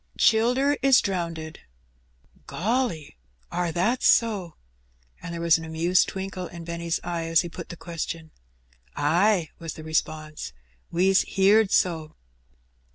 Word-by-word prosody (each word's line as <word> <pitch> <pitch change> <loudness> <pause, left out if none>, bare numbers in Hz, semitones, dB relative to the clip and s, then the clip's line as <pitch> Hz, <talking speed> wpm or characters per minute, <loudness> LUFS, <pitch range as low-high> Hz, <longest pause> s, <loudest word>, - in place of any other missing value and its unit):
"Childer 250 +6 +3
is 270 -1 +6
drownded." 170 -5 -3 0.9
"Golly! 195 - -2 0.3
are 175 -1 -1
that 210 +10 0
so?" 205 -8 +2 0.7
and 170 - -7
there 170 - -5
was 165 -1 +4
an - - -8
amused 165 +3 +2
twinkle 190 -1 -5
in 170 -1 -9
Benny's 170 0 -3
eye 170 -1 -3
as 165 0 +4
he 175 - -6
put 170 0 -9
the 170 - -8
question. 165 -1 -6 0.6
"Ay," 170 +3 +2
was 165 -2 -6
the 155 - -9
response; 155 - -3 0.4
"we's 190 +3 +3
heerd 200 +2 +4
so." 160 -5 0
170 Hz, 130 wpm, -25 LUFS, 165-195 Hz, 0.9 s, is